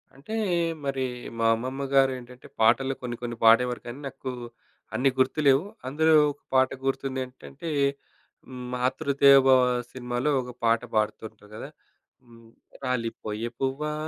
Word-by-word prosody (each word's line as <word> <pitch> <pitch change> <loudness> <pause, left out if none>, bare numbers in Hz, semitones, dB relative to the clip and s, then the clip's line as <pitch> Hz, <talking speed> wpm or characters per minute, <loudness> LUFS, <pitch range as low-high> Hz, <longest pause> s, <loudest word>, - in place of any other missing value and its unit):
అంటే 150 +12 -7 0.5
మరి 135 -1 -1 0.4
మా 115 - +1
అమ్మమ్మ 130 +4 -4
గారు 135 -1 +5
ఏంటంటే 125 0 -13
పాటలు 130 +4 +3
కొన్ని 120 -1 -4
కొన్ని 120 -1 -5
పాడేవారు 120 +2 +5
కానీ 120 +4 -7
నాకు 135 -1 -6 0.6
అన్ని 135 +1 +3
గుర్తులేవు. 135 +2 +3 0.2
అందులో 160 +4 +3 0.2
ఒక 145 - -15
పాట 130 0 +5 0.2
గుర్తుంది 135 0 -2
ఏంటంటే 135 +5 -10 0.8
హ్మ్, 125 -1 -8
'మాతృదేవొభవ' 130 -1 +4
సినిమాలో 125 +3 -2
ఒక 125 0 -8
పాట 115 0 +3
పాడుతుంటారు 110 0 -3
కదా! - - -7 0.5
హ్మ్. 115 -1 -18 0.3
రాలిపోయే 115 -3 -3
పువ్వా 135 +3 -2
130 Hz, 125 wpm, -26 LUFS, 120-135 Hz, 0.8 s, గారు